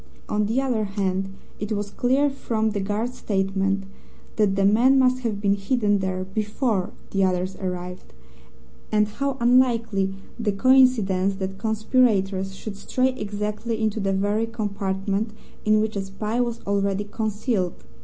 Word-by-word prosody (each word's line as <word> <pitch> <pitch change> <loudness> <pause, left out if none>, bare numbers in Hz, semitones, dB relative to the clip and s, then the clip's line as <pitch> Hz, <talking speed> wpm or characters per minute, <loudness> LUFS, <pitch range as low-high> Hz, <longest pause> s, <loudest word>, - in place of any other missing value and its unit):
On 210 0 0
the 230 +5 +1
other 245 -5 0
hand, 195 -1 -1 0.3
it 210 +1 -4
was 205 -1 -3
clear, 270 +5 +2
from 220 -5 -1
the 205 - -2
guard's 210 +5 -2
statement, 195 -1 0 0.5
that 205 -3 +3
the 195 0 +2
man 240 +7 +5
must 255 -1 +4
have 225 -5 -2
been 200 -1 +2
hidden 205 0 +1
there 185 -1 -2
BEFORE 210 +1 -1 0.2
the 195 -1 +2
others 185 0 0
arrived, 180 - -5 0.8
and 210 -1 +3
how 275 +5 -2
unlikely 230 -5 +3 0.2
the 215 -3 0
coincidence 205 -5 +4
that 190 0 -5
conspirators 210 -4 +1
should 200 0 -7
stray 255 +5 +1
exactly 210 -1 -3
into 220 0 0
the 195 -1 0
very 205 +4 +1
compartment 200 -1 -2 0.3
in 215 0 +4
which 220 0 -1
a 200 - 0
spy 210 +5 -2
was 235 -1 -2
already 200 0 0
concealed! 210 - -2
210 Hz, 145 wpm, -24 LUFS, 195-230 Hz, 0.8 s, man